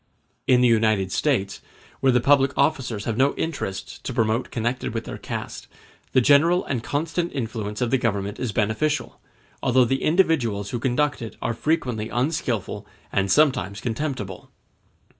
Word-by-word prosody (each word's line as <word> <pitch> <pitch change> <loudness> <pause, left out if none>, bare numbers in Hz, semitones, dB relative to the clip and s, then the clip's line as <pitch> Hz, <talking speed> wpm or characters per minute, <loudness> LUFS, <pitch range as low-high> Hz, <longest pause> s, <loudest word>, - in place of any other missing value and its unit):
]] - - -45
In 125 - +5
the 125 - +5
United 110 -4 +2
States, 100 -9 0 0.4
where 135 - +4
the 125 - +4
public 135 +2 +3
officers 125 -7 0
have 115 -1 -2
no 135 +2 +3
interests 145 -12 -4
to 130 - -6
promote 115 +1 +1
connected 120 0 -2
with 115 - -2
their - - -7
caste, - - -6 0.5
the 130 - +5
general 155 +8 +4
and 130 -4 -2
constant 165 +5 -2
influence 110 -5 -4
of 120 - 0
the 135 - +3
Government 105 -3 -2
is 125 -4 -2
beneficial, 110 +9 -1 0.4
although 130 -1 +4
the 135 +3 0
individuals 145 - +1
who 120 - -2
conduct 140 +3 0
it 115 - -7
are 120 - -1
frequently 120 -5 -1
unskilful 125 - -2 0.2
and 100 -1 +1
sometimes 100 - +2
contemptible. 115 -6 -4
125 Hz, 160 wpm, -24 LUFS, 110-140 Hz, 0.5 s, In